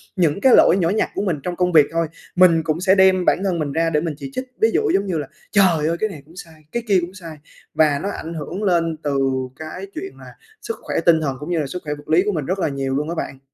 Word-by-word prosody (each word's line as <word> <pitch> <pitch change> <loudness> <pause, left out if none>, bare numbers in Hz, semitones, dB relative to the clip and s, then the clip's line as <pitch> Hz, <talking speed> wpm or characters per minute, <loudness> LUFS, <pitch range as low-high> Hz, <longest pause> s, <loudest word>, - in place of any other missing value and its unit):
những 175 -1 +1
cái 260 -2 +6
lỗi - - +6
nhỏ 170 -3 +1
nhặt 210 +4 0
của - - -1
mình 180 -7 -1
trong 180 - -3
công 180 0 +1
việc 155 -4 +6
thôi, 165 0 0 0.3
mình 175 -3 +5
cũng 160 +1 -2
sẽ 190 +1 +4
đem 190 -1 +4
bản 190 - +2
thân 185 -4 0
mình 150 -2 -2
ra 165 +1 +1
để 150 -2 +1
mình 165 -2 -3
chỉ 270 - -7
trích. 255 0 -4 0.2
Ví 445 - +5
dụ 435 - +1
giống 195 - +1
như 185 -4 -2
là 145 -3 -4 0.2
"Trời 175 -7 +3
ơi! 165 +1 0
Cái 215 - 0
này 155 -8 -9
cũng 160 +3 -19
sai, 160 -3 -12
cái 235 - -3
kia 200 -3 +4
cũng 175 +2 -6
sai!" 165 -5 -10 0.4
Và 150 -3 +3
nó 200 - -1
ảnh 165 -4 -6
hưởng 165 +6 -5
lên 165 -4 +1
từ 140 -2 0 0.4
cái 155 - -7
chuyện 380 +5 -5
là - - -12 0.3
sức 455 - -4
khỏe - - -5
tinh 165 -2 +5
thần 140 -4 -2
cũng 150 +3 -7
như 175 -2 0
là 150 - -2
sức 180 +6 -6
khỏe 150 - -2
vật 145 0 -15
lý 165 +4 +4
của 210 - +1
mình 155 -7 -3
rất 185 +5 -2
là 160 - 0
nhiều 135 -1 -3
luôn 150 +3 -2
á 170 - -3
bạn. 135 -4 -5
170 Hz, 295 wpm, -20 LUFS, 155-190 Hz, 0.4 s, cái